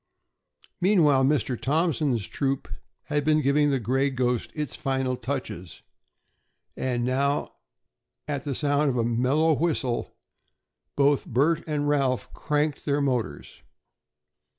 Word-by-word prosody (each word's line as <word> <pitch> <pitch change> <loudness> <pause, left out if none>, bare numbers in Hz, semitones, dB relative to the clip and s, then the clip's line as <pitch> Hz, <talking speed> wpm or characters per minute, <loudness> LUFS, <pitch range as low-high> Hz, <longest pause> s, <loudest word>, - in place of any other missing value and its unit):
Meanwhile, 155 -9 +4
Mr. 135 -4 0
Thompson's 145 - +1
troop 135 -1 -2 0.4
had 150 -1 -1
been 155 +1 +3
giving 145 +1 +3
the 135 -2 +1
"Gray 130 +4 +1
Ghost" 125 -2 -1
its 150 -4 -4
final 130 -1 -1
touches, 125 - -6 0.9
and 120 -2 -1
now, 140 +3 0 0.7
at 145 -2 -3
the 140 -3 -3
sound 145 +1 +1
of 125 - -1
a 115 - +2
mellow 130 +7 +2
whistle, 145 -6 -1 0.8
both 140 0 +2
Bert 150 +7 +2
and 150 -1 -1
Ralph 135 -4 0
cranked 150 -1 -1
their 145 0 +1
motors. 125 - -2
140 Hz, 120 wpm, -26 LUFS, 130-150 Hz, 0.9 s, Meanwhile